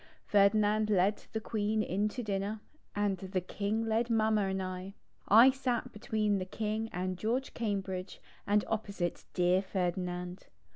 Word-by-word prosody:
Ferdinand 210 Hz, +1 st, +3 dB
led 200 Hz, +1 st, +2 dB
the 220 Hz, -, -2 dB
Queen 215 Hz, -1 st, 0 dB
in 205 Hz, +3 st, 0 dB
to 245 Hz, +3 st, -5 dB
dinner 205 Hz, +1 st, -2 dB, 0.4 s
and 205 Hz, -2 st, 0 dB
the 190 Hz, 0 st, -2 dB
King 205 Hz, +5 st, -2 dB
led 225 Hz, +2 st, +1 dB
Mamma 220 Hz, -2 st, +2 dB
and 190 Hz, 0 st, -1 dB
I. 185 Hz, +1 st, -5 dB, 0.3 s
I 230 Hz, +6 st, +8 dB
sat 255 Hz, -3 st, -2 dB
betv/een 210 Hz, -1 st, 0 dB
the 185 Hz, -, -3 dB
King 215 Hz, +3 st, -3 dB
and 185 Hz, 0 st, -3 dB
George 245 Hz, +6 st, -1 dB
Cambridge 195 Hz, -4 st, -3 dB, 0.3 s
and 205 Hz, 0 st, +3 dB
opposite 200 Hz, -5 st, -3 dB
dear 180 Hz, +1 st, +3 dB
Ferdinand. 180 Hz, -1 st, -3 dB
205 Hz, 145 wpm, -32 LUFS, 185-220 Hz, 0.4 s, I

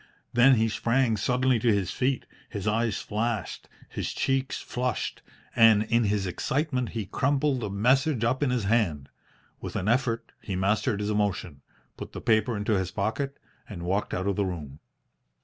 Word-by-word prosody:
Then 125 Hz, +2 st, +6 dB
he 110 Hz, -1 st, +2 dB
sprang 115 Hz, +2 st, +1 dB
suddenly 125 Hz, +3 st, +1 dB
to 115 Hz, +1 st, +3 dB
his 100 Hz, -3 st, 0 dB
feet, 130 Hz, +1 st, 0 dB, 0.2 s
his 100 Hz, -2 st, -5 dB
eyes 110 Hz, 0 st, +1 dB
flashed, 110 Hz, +1 st, -3 dB, 0.2 s
his -, -, -4 dB
cheeks 135 Hz, 0 st, 0 dB
flushed, 125 Hz, -1 st, -3 dB, 0.3 s
and 110 Hz, -2 st, +6 dB
in 115 Hz, +1 st, +2 dB
his 100 Hz, -1 st, 0 dB
excitement 130 Hz, -, -1 dB
he 110 Hz, -, -2 dB
crumpled 140 Hz, +5 st, +1 dB
the 105 Hz, -4 st, -3 dB
message 125 Hz, +6 st, +2 dB
up 130 Hz, +4 st, +1 dB
in 145 Hz, -, +2 dB
his 125 Hz, -3 st, 0 dB
hand. 100 Hz, -10 st, +1 dB, 0.5 s
With -, -, -7 dB
an 95 Hz, -, -2 dB
effort 120 Hz, 0 st, 0 dB
he 95 Hz, -, -4 dB
mastered 100 Hz, +2 st, +1 dB
his 105 Hz, +1 st, -1 dB
emotion, 100 Hz, -8 st, -1 dB, 0.4 s
put -, -, -8 dB
the -, -, -5 dB
paper 110 Hz, +1 st, +2 dB
into 105 Hz, +2 st, -1 dB
his 95 Hz, -3 st, 0 dB
pocket, 110 Hz, +9 st, -2 dB, 0.3 s
and 90 Hz, -6 st, -7 dB
walked 95 Hz, +4 st, -1 dB
out 95 Hz, -, -2 dB
of 100 Hz, -2 st, 0 dB
the 100 Hz, -, +1 dB
room. 75 Hz, -6 st, -6 dB
110 Hz, 170 wpm, -27 LUFS, 100-125 Hz, 0.5 s, Then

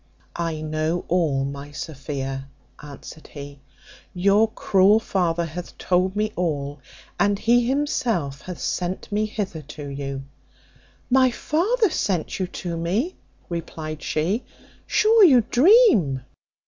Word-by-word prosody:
"I 165 Hz, -2 st, -2 dB
know 155 Hz, +2 st, -2 dB
all, 155 Hz, -7 st, +1 dB
my 140 Hz, +1 st, -6 dB
Sophia," 135 Hz, -2 st, -5 dB, 0.3 s
answered 150 Hz, +2 st, -11 dB
he; 140 Hz, -1 st, -10 dB, 0.6 s
"your 200 Hz, +4 st, +4 dB
cruel 200 Hz, +1 st, +4 dB
father 175 Hz, -5 st, 0 dB
hath 170 Hz, +2 st, -8 dB
told 185 Hz, +1 st, +1 dB
me 215 Hz, +1 st, -1 dB
all, 145 Hz, -5 st, -2 dB, 0.4 s
and 205 Hz, 0 st, +3 dB
he 235 Hz, +3 st, +3 dB
himself 235 Hz, -, -1 dB
hath 180 Hz, -2 st, -7 dB
sent 180 Hz, +3 st, -3 dB
me 210 Hz, +1 st, +1 dB
hither 195 Hz, -7 st, -4 dB
to 150 Hz, 0 st, -9 dB
you." 140 Hz, -1 st, -5 dB, 0.9 s
"My 260 Hz, 0 st, +5 dB
father 380 Hz, -, +1 dB
sent 185 Hz, -, -1 dB
you 185 Hz, -, -1 dB
to 175 Hz, -2 st, -5 dB
me!" 200 Hz, -, -1 dB, 0.3 s
replied 160 Hz, -2 st, -5 dB
she: 180 Hz, +10 st, -1 dB, 0.4 s
"sure 440 Hz, 0 st, +5 dB
you 265 Hz, -10 st, +7 dB
dream." 260 Hz, -, +5 dB
175 Hz, 120 wpm, -23 LUFS, 150-215 Hz, 0.9 s, you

